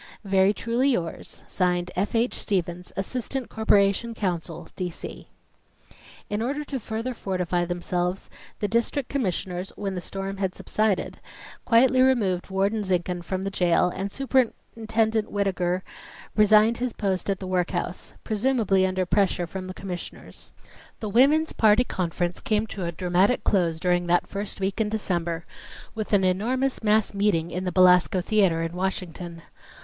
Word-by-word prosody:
Very 195 -1 +4
truly 235 +5 0
yours, 175 -11 -3
(Signed) 180 -1 0
F. 200 +5 -1
H. 235 +2 +2
STEVENS, 180 -3 -2
Assistant 250 +5 -3
Corporation 220 +1 +2
Counsel, 175 -5 -3
D. 180 -1 -2
C. 170 - -9 1.0
In 210 +1 -2
order 280 +5 -1
to 280 -2 -4
further 230 +3 -4
fortify 180 -5 -1
themselves, 175 +1 -2 0.3
the 205 - +1
District 235 +5 0
Commissioners, 185 -7 -2
when 195 -2 -3
the 180 - -4
storm 195 +2 -5
had 190 -2 -2
subsided, 215 -3 -1 0.5
quietly 255 +2 +5
removed 210 -10 +2
Warden 200 +3 +1
Zinkhan 180 -2 -1
from 185 +1 -3
the 195 - -2
jail 180 -1 +3
and 195 +1 -3
Superintendent 225 -4 0
Whittaker 185 -2 0 0.5
resigned 215 +2 +5
his 250 -2 -2
post 195 -2 -2
at 195 - +1
the 190 - -7
workhouse, 180 -1 -2
presumably 215 -4 +2
under 185 0 -1
pressure 190 -1 +1
from 185 +2 -6
the 185 - -6
Commissioners. 180 -3 -8 0.5
The 215 - -4
Woman's 285 +8 +4
Party 220 +2 +5
conference 175 -4 -2
came 215 0 +1
to 195 -4 -5
a 170 - -2
dramatic 180 +6 +2
close 170 -5 +1
during 175 0 +1
that 175 0 +3
first 200 0 -6
week 195 +3 -1
in 210 - +1
December 175 -6 -2 0.5
with 215 -1 -5
an 200 -2 +4
enormous 245 +9 0
mass 215 -1 +2
meeting 200 -5 +1
in 185 +1 -3
the 180 - -1
Belasco 185 +1 +5
Theatre 185 -4 +2
in 165 0 -3
Washington. 175 -2 -4
195 Hz, 150 wpm, -25 LUFS, 180-220 Hz, 1.0 s, quietly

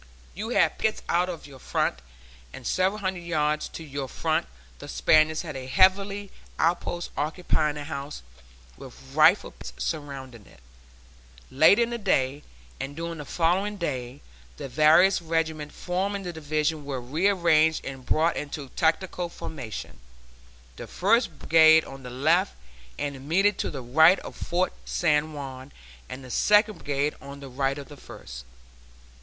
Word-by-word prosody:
You 215 +4 -5
had 245 - +2
pickets 220 0 0
out 175 +1 +2
to 170 -5 -7
your 135 -2 -13
front; - - -1 0.5
and - - -11
several 190 +3 0
hundred 190 -2 -2
yards 155 -3 0
to 165 - -8
your 140 -2 -5
front 155 - -1 0.3
the - - -9
Spaniards 155 +1 +3
had 155 -4 -7
a 130 -1 -6
heavy 195 +4 +2 0.3
outpost 175 +1 -1
occupying 150 0 0
a 145 - -5
house, 140 - -6 0.5
with - - -12
rifle - - +5
pits - - -10
surrounding 135 -7 -5
it. - - -19 0.9
Later 160 - +6
in 235 - -3
the 235 - -3
day, 140 - +1 0.4
and 135 +2 -5
during 165 0 -5
the 150 - -6
following 185 +7 0
day, 130 -6 -4 0.4
the - - -6
various 155 +8 +5
regiments 160 -2 -2
forming 195 +3 -2
the 175 -1 -5
Division 155 0 -1
were 140 -2 -4
rearranged 160 +3 +2
and 135 -1 -7
brought 160 +5 +1
into 145 -2 -5
tactical 175 +3 0
formation, 120 - -7 0.8
the - - -8
First 200 - +1
Brigade 160 0 +6
on 135 0 -10
the 125 - -8
left 160 +10 +1 0.4
and 140 -1 -3
immediately 180 +9 +1
to - - -1
the 135 -3 -6
right 160 +9 +6
of - - -9
Fort 180 +1 -1
San 155 -2 +1
Juan, 135 -1 -8 0.4
and 130 - -8
the 125 - -9
Second 210 - +3
Brigade 145 +1 -1
on 140 0 -9
the 140 -1 -9
right 135 +2 -1
of 140 -2 -8
the 145 - -12
First. - - -11
155 Hz, 155 wpm, -26 LUFS, 140-180 Hz, 0.9 s, Later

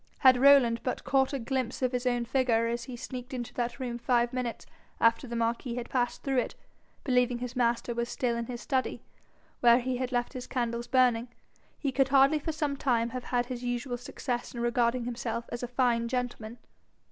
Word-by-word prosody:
Had 260 -2 +7
Rowland 265 -5 +6
but 255 - -3
caught 265 -1 +2
a 280 - -1
glimpse 260 0 -2
of 255 - +2
his 250 0 -1
own 245 -1 +1
figure 240 -2 +2
as 235 +1 -2
he 255 -2 -7
sneaked 250 +2 -6
into 240 -2 -5
that 240 +1 -3
room 240 -2 -4
five 240 0 +1
minutes 250 -2 -3 0.3
after 230 +3 +3
the 235 - -5
marquis 235 +1 -1
had 245 -1 -5
passed 245 -2 -1
through 270 -2 +1
it, - - -3 0.5
believing 250 -2 +2
his 250 +1 -6
master 240 -1 +1
was 235 0 -2
still 240 -1 -1
in 235 0 -3
his 245 -1 -5
study, 260 -2 -1 0.6
where 235 -1 +6
he 255 0 -1
had 255 0 -3
left 245 +1 -1
his 255 -2 -6
candles 235 -1 -2
burning, 250 -2 +3 0.5
he 280 - -1
could 270 0 +2
hardly 275 +3 +5
for 320 - -3
some 295 -2 -1
time 235 -4 +1
have 250 +1 -6
had 245 -1 0
his 250 0 -6
usual 245 +1 -2
success 245 0 -4
in - - -4
regarding 240 +1 +1
himself 235 -1 -3
as 240 - -4
a 245 - -3
fine 240 -2 +1
gentleman. 245 -2 -3
245 Hz, 205 wpm, -29 LUFS, 235-255 Hz, 0.6 s, Had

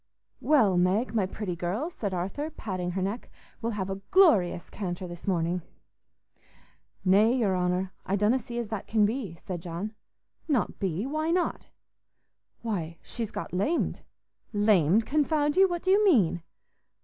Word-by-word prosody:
"Well, 220 -12 +4
Meg, 200 +6 +1
my 205 -5 +1
pretty 190 -2 -4
girl," 195 - -2
said 205 - -4
Arthur, 195 - -3
patting 185 - -4
her 190 0 -1
neck, 205 +5 -4 0.3
"we'll 230 0 -1
have 190 -3 -2
a 195 0 -5
glorious 210 - +4
canter 185 -2 -5
this 175 +2 -10
morning." 175 -1 0 1.4
"Nay, 210 +6 +5
your 205 -6 +2
honour, 180 +1 0
I 195 - -1
donna 210 +6 +3
see 240 0 -7
as 235 -3 -3
that 220 -3 -4
can 215 -2 +3
be," 215 -5 -2
said 175 0 -6
John. 175 +6 -5 0.5
"Not 275 -9 0
be? 190 +2 -1
Why 310 +3 -1
not?" 350 +1 0 1.0
"Why, 170 -8 -3
she's 230 -3 -4
got - - -6
lamed." 205 - 0 0.5
"Lamed, 205 -1 +4
confound 295 +1 +1
you! 385 0 +6
What 345 -1 -3
do 375 - +2
you 410 +2 +5
mean?" 205 - +4
205 Hz, 155 wpm, -28 LUFS, 180-255 Hz, 1.4 s, you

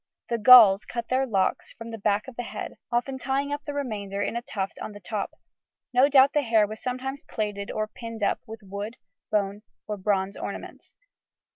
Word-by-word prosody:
The 235 -1 0
Gauls 215 -4 +9
cut 235 -1 -5
their 265 +1 +2
locks 195 -5 0
from 230 0 -9
the 225 - -5
back 205 +2 +1
of 260 - -9
the 245 - -3
head, 240 - -6
often 260 +3 -1
tying 275 +2 -1
up 290 +1 -5
the 290 - -4
remainder 205 -8 -3
in 205 - -1
a 235 - -1
tuft 195 -5 -4
on 215 - -6
the 205 - -10
top; 200 +2 -3 0.6
no 255 +3 +5
doubt 275 -1 +6
the 295 - +3
hair 225 -5 +3
was 215 +1 -8
sometimes 260 +2 -4
plaited 205 -2 -4
or 215 0 -2
pinned 230 0 -7
up - - +1
with 220 0 -9
wood, 200 +3 -6 0.3
bone, 205 -1 0 0.2
or 210 -1 -4
bronze 195 0 0
ornaments. - - -8
225 Hz, 195 wpm, -26 LUFS, 205-255 Hz, 0.6 s, Gauls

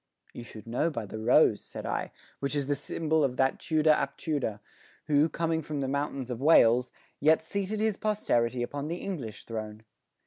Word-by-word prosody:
"You 120 - -8
should 110 -2 -11
know 120 +8 0
by 115 -8 -4
the 110 +2 -7
rose," 110 - +4
said - - -8
I, - - -2 0.3
"which 140 +1 -2
is 145 -2 0
the 145 - +1
symbol 155 +2 0
of 125 -2 0
that 135 0 +2
Tudor 155 -1 +3
ap 150 - 0
Tudor, 140 -10 -2 0.5
who, 150 +1 +3
coming 165 -1 -1
from 150 -1 -4
the 135 - -1
mountains 140 -2 -2
of 120 0 -5
Wales, 125 -5 +5 0.3
yet 155 +2 +4
seated 200 +4 -3
his 220 -2 +1
posterity 125 - 0
upon 145 +4 -4
the 170 +2 -3
English 145 - -6
throne. 110 -1 -6
145 Hz, 185 wpm, -29 LUFS, 120-160 Hz, 0.5 s, Wales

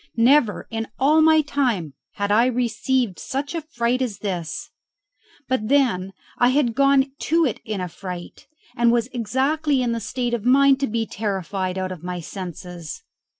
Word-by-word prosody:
Never 235 -1 +3
in 225 0 -3
all 300 +4 +4
my 315 0 +6
time 245 - -1 0.2
had 200 0 -2
I 230 +4 +5
received 245 -3 0
such 285 +4 -4
a 335 - -2
fright 250 -4 -1
as 230 -6 -2
this; 190 - -4 0.8
but 250 -4 0
then 235 -9 +2 0.3
I 245 - +5
had 255 -3 +2
gone 275 +1 +3
to 330 0 +2
it 245 - -2
in 215 -2 -3
a 180 - -2
fright, 180 0 -8 0.3
and 235 -1 +4
was 235 0 +1
exactly 270 +5 0
in 240 - 0
the 230 - -1
state 240 +2 -3
of 235 -4 -1
mind 275 +2 +5
to 275 - 0
be 225 +1 -1
terrified 190 -3 -3
out 185 0 -2
of 175 -3 -8
my 180 0 -4
senses. 175 -2 -7
235 Hz, 170 wpm, -22 LUFS, 195-270 Hz, 0.8 s, my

